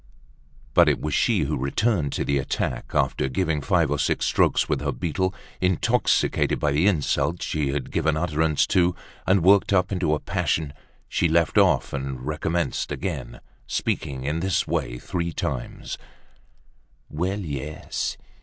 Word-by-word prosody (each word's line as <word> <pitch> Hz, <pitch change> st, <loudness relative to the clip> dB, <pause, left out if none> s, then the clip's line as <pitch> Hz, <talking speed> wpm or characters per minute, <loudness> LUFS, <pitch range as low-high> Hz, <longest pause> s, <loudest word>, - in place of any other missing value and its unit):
But -, -, +6 dB
it -, -, +1 dB
was 75 Hz, -, -3 dB
she 105 Hz, -, +2 dB
who 70 Hz, -, 0 dB
returned 75 Hz, -, 0 dB
to -, -, -1 dB
the 70 Hz, -1 st, +1 dB
attack, 65 Hz, -2 st, -3 dB
after -, -, +1 dB
giving 80 Hz, +1 st, 0 dB
five 80 Hz, -1 st, +2 dB
or 75 Hz, -, 0 dB
six -, -, +1 dB
strokes -, -, +2 dB
with 75 Hz, -3 st, 0 dB
her 70 Hz, 0 st, -1 dB
beetle, 95 Hz, +4 st, -1 dB, 0.3 s
intoxicated 90 Hz, -2 st, +2 dB
by 75 Hz, -, +1 dB
the 75 Hz, +7 st, +3 dB
insults 85 Hz, -1 st, +1 dB
she 75 Hz, -2 st, -1 dB
had 70 Hz, -1 st, -1 dB
been -, -, -13 dB
giving 80 Hz, +1 st, +1 dB
utterance 80 Hz, -2 st, +1 dB
to, 90 Hz, -1 st, +2 dB, 0.3 s
and 95 Hz, -2 st, +4 dB
worked 100 Hz, +2 st, +5 dB
up 90 Hz, -1 st, +2 dB
into 90 Hz, -5 st, +1 dB
a -, -, -4 dB
passion. 75 Hz, -3 st, -1 dB, 0.3 s
She 85 Hz, -, +1 dB
left 85 Hz, +5 st, +3 dB
off 95 Hz, -8 st, +3 dB
and 70 Hz, -2 st, -4 dB
recommenced 80 Hz, +3 st, -1 dB
again, 70 Hz, -10 st, -4 dB, 0.3 s
speaking 65 Hz, -2 st, -2 dB
in 75 Hz, +4 st, -1 dB
this 95 Hz, -2 st, +1 dB
way -, -, -2 dB
three 85 Hz, +5 st, -3 dB
times: -, -, -4 dB, 1.1 s
"Well, 90 Hz, +7 st, -2 dB
yes! 75 Hz, -2 st, -4 dB
80 Hz, 155 wpm, -24 LUFS, 70-90 Hz, 1.1 s, But